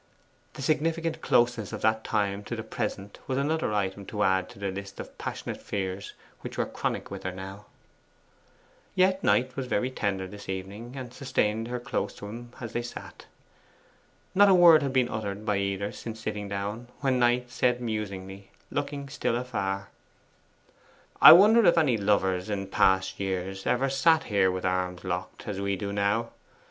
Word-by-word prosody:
The 135 - -7
significant 165 +2 0
closeness 120 -3 +2
of - - -5
that 110 0 +2
time 100 -2 -1
to 120 - -4
the 110 - -5
present 105 -3 -5
was 130 - -1
another 150 -1 0
item 100 -1 -1
to 105 -1 -1
add 95 0 +2
to - - -14
the 100 -1 -3
list 100 0 -8
of - - -8
passionate - - -5
fears 95 -1 -4 0.3
which - - -8
were - - +1
chronic - - -3
with - - -6
her 95 - -3
now. 95 +2 -9 1.3
Yet 185 +1 +3
Knight 125 +1 +2
was 135 -2 -3
very 125 +2 0
tender 100 -6 -2
this 100 +1 -10
evening, 100 +6 -6
and 125 -3 -7
sustained 115 -5 -1
her 125 0 -3
close 120 -5 -3
to - - -9
him 120 +3 -8
as 120 -3 -6
they 120 - 0
sat. 120 - -9 1.1
Not 200 +1 +6
a 190 - +7
word 170 -3 +8
had 140 -2 -1
been 130 -2 +2
uttered 105 -1 -4
by 105 -2 +1
either 100 +1 -1
since 110 -1 -7
sitting 105 -2 -4
down, 100 +4 -4
when 130 -3 +2
Knight 120 0 +2
said 125 0 +1
musingly, 100 -4 -5 0.2
looking 145 -1 -3
still 135 -4 -1
afar 100 -6 -3 1.3
'I - - +13
wonder 215 +6 +7
if 175 -3 +5
any 150 -7 +4
lovers 95 -2 +1
in 100 -2 -2
past 95 0 +2
years 95 0 -3
ever 130 +2 +2
sat 155 +4 +3
here 100 -6 +2
with 95 0 -3
arms 90 -1 -1
locked, 90 -1 -5
as 100 -2 -3
we 100 0 0
do 100 +1 -4
now. 100 +3 0
105 Hz, 175 wpm, -27 LUFS, 100-125 Hz, 1.3 s, I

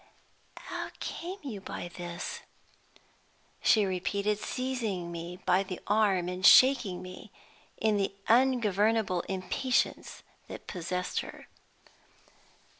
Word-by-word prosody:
"How - - -5
came 360 +3 -5
you 225 -9 -6
by 185 - -6
this?" 175 0 -6 1.2
she 215 -2 +4
repeated, 200 +3 -1
seizing 225 -10 -3
me 170 +1 -6
by 185 +1 +4
the 185 -2 -5
arm 200 -4 +2
and 180 +1 -5
shaking 240 -6 +6
me, 185 0 -10 0.5
in 215 -2 +2
the 195 -1 0 0.2
ungovernable 220 -5 +3
impatience 195 +7 -1 0.2
that - - -9
possessed 180 0 -3
her. - - -9
195 Hz, 105 wpm, -30 LUFS, 180-225 Hz, 1.2 s, shaking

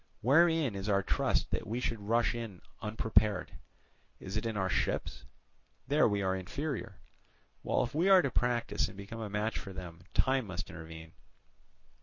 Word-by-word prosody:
wherein 155 +1 +4
is 100 +1 -4
our 100 -1 +3
trust - - +1
that - - -2
we 115 +4 -2
should 115 -3 -2
rush 115 +4 +2
on 115 -4 -5
it - - -23 0.2
unprepared? 105 -2 +1 0.7
Is 95 +2 -7
it 110 +2 -1
in 110 -2 -2
our 95 -1 +1
ships? - - -1 0.6
There 150 +2 +4
we 100 -2 0
are 95 0 +1
inferior; 115 - -4 0.7
while - - +1
if 125 - -4
we 170 +6 +2
are 190 -2 +8
to 140 - 0
practise 120 -1 +1
and 95 - -11
become 100 +3 -7
a 110 - -4
match 105 +2 -1
for 95 - -8
them, 85 -2 -8 0.2
time 130 -3 +2
must 95 0 -5
intervene. 80 0 -9
110 Hz, 175 wpm, -32 LUFS, 95-125 Hz, 0.7 s, are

